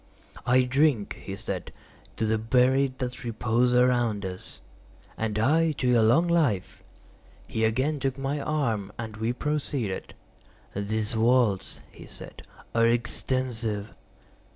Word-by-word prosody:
"I 130 +1 +5
drink," 130 -4 +1
he 95 - -5
said, - - -5 0.5
"to 110 - 0
the 110 0 +1
buried 130 +3 +2
that 125 -1 -4
repose 120 +1 +1
around 120 -5 +2
us." 90 -1 -7 0.6
"And 110 -1 -2
I 155 +8 +3
to 130 -3 -2
your 120 -2 +5
long 135 +11 +4
life." 150 - +1 0.6
He 110 - -2
again 130 +7 0
took 135 0 -1
my 135 +2 -2
arm, 115 -10 -1
and 110 -1 -6
we 110 +2 0
proceeded. 135 -6 -3 0.6
"These 105 +2 -2
vaults," 115 -4 +2
he - - -13
said, - - -10 0.3
"are 115 0 +4
extensive." 120 -3 -1
120 Hz, 130 wpm, -27 LUFS, 110-135 Hz, 0.6 s, I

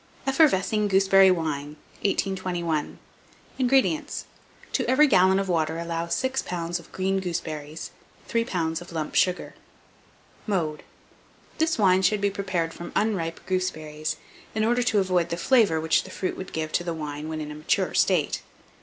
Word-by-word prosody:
EFFERVESCING 220 - +3
GOOSEBERRY 195 0 +5
WINE. 150 -4 -1 0.3
1821. 180 -5 -1 0.6
INGREDIENTS. 270 +4 +1 0.5
To - - 0
every 290 +4 +6
gallon 190 -6 +5
of 195 0 -1
water 160 -2 0
allow 170 0 -3
6 260 +9 0
lbs. 175 0 -3
of 170 - -16
green 190 +1 0
gooseberries, 160 -4 -5 0.4
3 230 0 +1
lbs. 165 -6 -2
of 175 - -11
lump 155 -2 -3
sugar. 180 -1 +1 0.9
Mode. 165 -7 -1 0.8
This 320 0 +2
wine 190 -3 +4
should 210 +2 +2
be 200 0 +1
prepared 185 -4 -2
from 175 - -8
unripe 180 -7 0
gooseberries, 155 -5 -2 0.4
in 215 0 +1
order 240 +2 +2
to 240 -3 +1
avoid 185 -3 +2
the 170 - -2
flavour 205 -5 +3
which 160 0 +2
the - - -11
fruit 185 0 -3
would 190 - -7
give 155 -1 -3
to 175 - 0
the 170 -1 -3
wine 150 0 -5
when 160 0 -4
in 150 -1 -5
a - - -7
mature 150 - 0
state. - - +2
180 Hz, 155 wpm, -25 LUFS, 160-200 Hz, 0.9 s, every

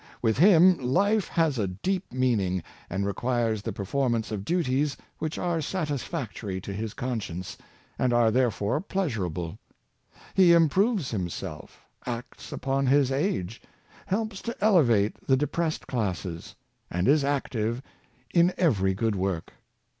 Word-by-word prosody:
With 115 0 +1
him 180 0 +7
life 195 - +2
has 160 -7 +1
a 100 - +1
deep 180 - -3
meaning, 105 -9 +1 0.3
and 95 +2 -1
requires 115 +1 0
the 115 - -3
performance 115 +3 -1
of 100 -3 -3
duties 145 - 0 0.2
which 155 0 -3
are 175 -2 0
satisfac 145 - -3
tory 95 -4 -4
to 100 +1 -6
his 110 +1 -4
conscience, 100 -8 -4 0.4
and 125 - +2
are 120 -2 +4
therefore 120 - +1
pleasurable. 100 - -3 0.7
He 180 -3 +6
improves 175 - +3
himself, 90 -6 -5 0.2
acts 120 0 -6
upon 135 0 -1
his 135 0 +4
age, 135 - -1 0.5
helps 205 0 -2
to 235 +2 -5
elevate 125 - +3
the 130 - +4
depressed 155 +3 -1
classes, 90 - -3 0.3
and 90 +4 -1
is 145 +1 +5
active 125 -4 -1 0.5
in 175 +1 +4
every 95 - +2
good 110 +1 0
work. 95 -3 -2
125 Hz, 130 wpm, -27 LUFS, 100-160 Hz, 0.7 s, him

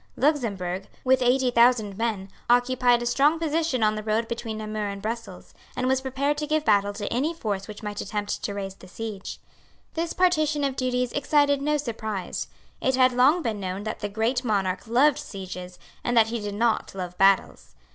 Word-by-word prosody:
Luxemburg, 200 - 0 0.2
with 260 0 +3
eighty 250 +1 +3
thousand 235 -4 +4
men, 210 -3 -2 0.2
occupied 245 0 +3
a - - -3
strong 280 +6 +3
position 320 -6 0
on 215 0 +3
the 215 - -4
road 220 +2 0
between 230 -1 -4
Namur 215 -1 -3
and 200 0 -5
Brussels, 215 -2 -6 0.2
and 250 - -1
was 265 0 +2
prepared 275 +3 -1
to 300 - -3
give 310 0 0
battle 205 -1 +3
to 205 0 -5
any 295 +8 0
force 200 -9 -3
which 210 0 -9
might 210 -1 -4
attempt 205 0 -3
to 200 - -3
raise 195 -1 -4
the 190 - -15
siege. 210 0 -6 0.5
This 330 0 -2
partition 310 -5 +2
of 275 -2 0
duties 250 -1 0
excited 285 -1 +2
no 300 +1 +1
surprise. 220 -8 -4 0.3
It 260 0 +2
had 255 0 +5
long 280 +8 +4
been 220 -3 -2
known 190 +1 -4
that 215 +1 -4
the 205 - -3
great 225 +5 0
Monarch 195 -3 -1
loved 270 +6 +4
sieges, 185 -2 -8 0.3
and 240 -1 0
that 225 -1 +5
he 235 0 -2
did 205 -1 -5
not 225 -2 0
love 180 -2 -5
battles. 195 0 +2
230 Hz, 190 wpm, -25 LUFS, 205-265 Hz, 0.5 s, had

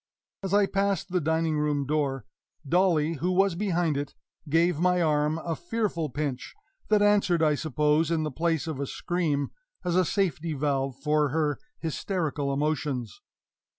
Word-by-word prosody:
As 195 -1 -4
I 205 0 +5
passed 195 -2 -1
the 180 -1 +1
dining 160 0 +1
room 145 -2 0
door, 135 -4 -1 0.4
Dolly, 165 -2 +2
who 175 +6 0
was 195 0 +3
behind 175 -5 0
it, 145 0 -4 0.3
gave 165 +1 +3
my 180 +1 +3
arm 150 -1 +2
a 165 0 -3
fearful 175 -3 -2
pinch 140 -1 -4 0.3
that 210 -1 +4
answered, 200 -5 +3
I 155 -1 +4
suppose, 150 +1 +1
in 165 -2 +1
the 155 - -2
place 165 +2 0
of 155 -4 -4
a 140 - -2
scream, 155 -5 -1 0.3
as 175 -1 0
a 185 - +5
safety 170 -4 -1
valve 135 -2 -1
for 150 +1 +1
her 150 0 0 0.2
hysterical 160 -3 -2
emotions. 145 -5 -2
160 Hz, 155 wpm, -27 LUFS, 145-175 Hz, 0.4 s, I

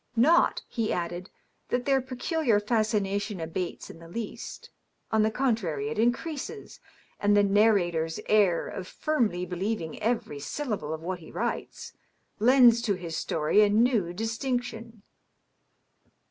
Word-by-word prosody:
" - - -41 0.2
Not," 340 - +3
he 225 -2 -2
added, 175 +2 -3 0.2
" - - -44
that 245 0 -1
their 270 -1 +3
peculiar 255 - 0
fascination 210 -2 0
abates 165 +2 -4
in 165 - -12
the 165 - -12
least; 215 +5 -7 0.4
on 220 -1 +3
the 215 - +3
con 250 +1 +1
trary, 150 -9 -3
it 155 - -4
increases; 295 - -2 0.4
and 205 0 +3
the 205 - +5
narrator's 195 -6 +2
air 200 -5 +3
of 185 -1 -6
firmly 225 - -1
believing 180 -1 -3
every 225 -10 -1
syl 265 - -5
lable 150 -5 -6
of 160 - -11
what 180 +1 -3
he 160 - -13
writes, - - -4 0.5
lends 240 0 +6
to 205 -4 0
his 170 -3 -6
story 160 +6 +2
a 210 - +5
new 215 -4 +2
distinction. 230 +1 -4
210 Hz, 145 wpm, -27 LUFS, 175-235 Hz, 0.5 s, lends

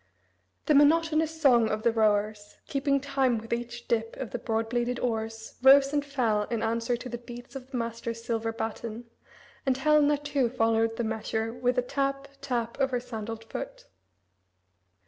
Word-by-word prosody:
The 305 - +3
monotonous 320 +2 +3
song 240 -7 +5
of 215 0 -2
the 235 - +4
rowers, 210 -1 0
keeping 275 0 +1
time 270 -3 +1
with 225 +1 -4
each 240 0 -5
dip 225 -1 -1
of 260 -4 -5
the 245 - -3
broad 225 0 -1
bladed 240 +1 -1
oars, 225 -2 -3
rose 275 +1 +7
and 290 -1 +1
fell 235 -7 0
in 230 0 -2
answer 230 +2 0
to 250 - -8
the 240 -1 -5
beats 240 +2 -11
of 260 -1 -8
the 265 - -4
master's 230 0 -4
silver 225 -1 -1
baton, 225 +1 -5 0.6
and 265 -2 +1
Helena 295 +1 +4
too 285 -4 0
followed 225 -1 +1
the 235 - -1
measure 220 0 -2
with 245 +1 0
the 250 - +1
tap, 275 +1 -2
tap, 240 -3 -2
of 270 -1 +2
her 250 -2 0
sandaled 225 -2 -6
foot. 225 - -7
240 Hz, 170 wpm, -28 LUFS, 225-275 Hz, 0.6 s, rose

